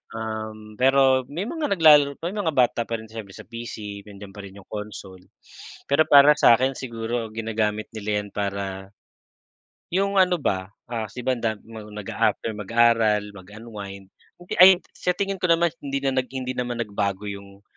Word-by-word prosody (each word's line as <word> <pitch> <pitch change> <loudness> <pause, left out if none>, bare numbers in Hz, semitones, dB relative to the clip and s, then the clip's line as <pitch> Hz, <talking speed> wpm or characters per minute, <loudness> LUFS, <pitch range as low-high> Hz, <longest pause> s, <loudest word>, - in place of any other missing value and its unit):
Um, 110 -1 -6
pero 130 -1 +4
may 165 +7 -4
mga 310 +6 -3
naglalaro 150 -4 +6
pa 170 +3 -5
may 210 - -5
mga 160 -6 -1
bata 120 -2 +2
pa 115 - -2
rin 110 0 -9
siyempre 105 -4 -9
sa - - -10
PC 105 -3 -8
nandiyan 100 -1 -11
pa - - -10
rin 100 0 -11
yung 95 - -17
console. 100 -3 -8 0.6
Pero 140 +3 +4
para 145 +1 +8
sakin 130 +2 +4
siguro 115 -2 -4
ginagamit 110 -1 -2
nila 105 -1 -2
yan 105 - -11
para, 100 -1 -4 1.0
yung 195 +2 0
ano 180 -2 +4
ba, 95 0 -1 0.2
ah, 115 -2 -2
si 125 - -7
banda 115 -4 0
nag-aafter 105 0 -3
mag-aaral 110 -1 +2
mag 95 -1 -13
unwind 100 -4 -9 0.3
hindi 175 - -6
ay 190 -1 +9 0.2
sa 180 - -1
tingin 195 0 -2
ko - - +3
naman 170 0 +4
hindi 140 -1 -2
na 135 - +1
hindi 130 0 -5
naman 120 -1 -3
nagbago 100 -1 -3
yung 100 0 -9
115 Hz, 165 wpm, -24 LUFS, 105-135 Hz, 1.0 s, ay